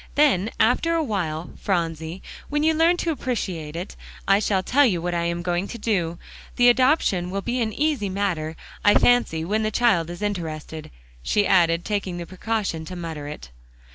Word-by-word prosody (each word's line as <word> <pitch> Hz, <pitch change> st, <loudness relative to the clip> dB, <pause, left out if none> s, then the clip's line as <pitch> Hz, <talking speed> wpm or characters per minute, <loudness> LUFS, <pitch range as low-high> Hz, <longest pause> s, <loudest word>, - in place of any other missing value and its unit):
Then 255 Hz, -9 st, +3 dB
after 330 Hz, +9 st, +3 dB
a 325 Hz, -, +1 dB
while, 175 Hz, -, -3 dB
Phronsie, 165 Hz, -1 st, -2 dB, 0.3 s
when 295 Hz, +1 st, 0 dB
you 320 Hz, +1 st, +4 dB
learn 330 Hz, +3 st, +3 dB
to 340 Hz, -, -1 dB
appreciate 185 Hz, -, -3 dB
it, 175 Hz, +3 st, -6 dB, 0.3 s
I 195 Hz, 0 st, +5 dB
shall 195 Hz, -3 st, 0 dB
tell 280 Hz, +9 st, +4 dB
you 200 Hz, -10 st, +2 dB
what 175 Hz, +1 st, -2 dB
I 170 Hz, 0 st, 0 dB
am 170 Hz, 0 st, -2 dB
going 175 Hz, +2 st, -1 dB
to -, -, -7 dB
do. 180 Hz, -7 st, -1 dB, 0.4 s
The 245 Hz, -1 st, +6 dB
adoption 245 Hz, -, +2 dB
will 195 Hz, +1 st, -3 dB
be 245 Hz, +1 st, -1 dB
an 220 Hz, -1 st, 0 dB
easy 285 Hz, -5 st, 0 dB
matter, 180 Hz, -5 st, -2 dB, 0.3 s
I 205 Hz, -, +5 dB
fancy, 235 Hz, -10 st, +3 dB
when 210 Hz, +5 st, 0 dB
the 215 Hz, -, 0 dB
child 205 Hz, -7 st, +2 dB
is 175 Hz, +4 st, -7 dB
interested," 160 Hz, -5 st, -4 dB, 0.3 s
she 205 Hz, -, +1 dB
added, 170 Hz, -3 st, +3 dB
taking 195 Hz, -4 st, -2 dB
the 170 Hz, -, -5 dB
precaution 190 Hz, -3 st, -3 dB
to 180 Hz, -, -7 dB
mutter 160 Hz, -4 st, -6 dB
it. 145 Hz, -, -9 dB
190 Hz, 185 wpm, -23 LUFS, 170-235 Hz, 0.4 s, The